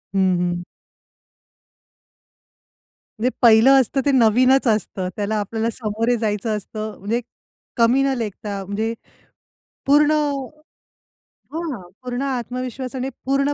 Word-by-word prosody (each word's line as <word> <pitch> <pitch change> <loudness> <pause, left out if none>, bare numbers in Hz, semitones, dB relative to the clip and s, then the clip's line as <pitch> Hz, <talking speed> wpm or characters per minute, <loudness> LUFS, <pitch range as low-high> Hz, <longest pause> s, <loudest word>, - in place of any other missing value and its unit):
हं, 185 -2 +3
हं. 175 0 -1 2.6
म्हणजे 245 +3 +2
पहिलं 235 +4 +7
असतं 270 +3 -1
ते 285 - +4
नवीनच 255 +2 +4
असतं. 205 -4 0
त्याला 210 +1 -2
आपल्याला 220 +2 -2
समोरे 225 +1 -1
जायचं 215 0 -1
असतं. 215 +1 -6
म्हणजे 225 +5 -1 0.6
कमी 235 +3 +4
न 275 0 +1
लेखता. 205 -3 -4
म्हणजे 215 +4 -2 0.9
पूर्ण 295 +2 +5 1.4
हां, 315 - -4 0.2
पूर्ण 250 0 -4
आत्मविश्वासाने, 255 0 -4 0.2
पूर्ण 275 +2 +1
230 Hz, 100 wpm, -21 LUFS, 210-260 Hz, 2.6 s, पहिलं